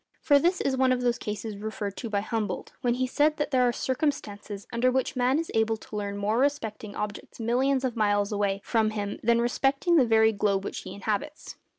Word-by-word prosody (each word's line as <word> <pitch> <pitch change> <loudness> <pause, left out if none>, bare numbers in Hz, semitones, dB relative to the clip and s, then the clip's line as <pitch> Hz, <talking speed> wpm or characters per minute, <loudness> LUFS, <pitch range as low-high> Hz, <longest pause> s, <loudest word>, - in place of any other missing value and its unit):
For 285 -1 +4
this 350 +5 +1
is 270 - +1
one 260 0 +3
of 250 -1 +1
those 240 -1 +1
cases 210 0 -5
referred 205 -1 -4
to 235 - -5
by 200 -2 0
Humboldt, 220 0 -3
when 240 -1 +1
he 255 +1 0
said 300 +4 +2
that 295 - -2
there 255 -2 +4
are - - +3
circumstances 220 -7 -3
under 240 +2 +3
which 260 +1 0
man 255 +2 +2
is 330 +1 -3
able 225 0 +2
to 215 - -11
learn 200 -1 -3
more 210 +3 0
respecting 225 -7 -1
objects 210 +2 -6
millions 260 +4 +1
of 250 -2 -2
miles 205 -2 +1
away 200 -1 0
from 220 -2 +1
him 205 -2 -4
than 235 +1 +3
respecting 275 +7 +2
the 260 -5 +5
very 220 0 +5
globe 200 -2 0
which - - -4
he - - -8
inhabits. 215 +10 -4
230 Hz, 215 wpm, -27 LUFS, 210-260 Hz, -, the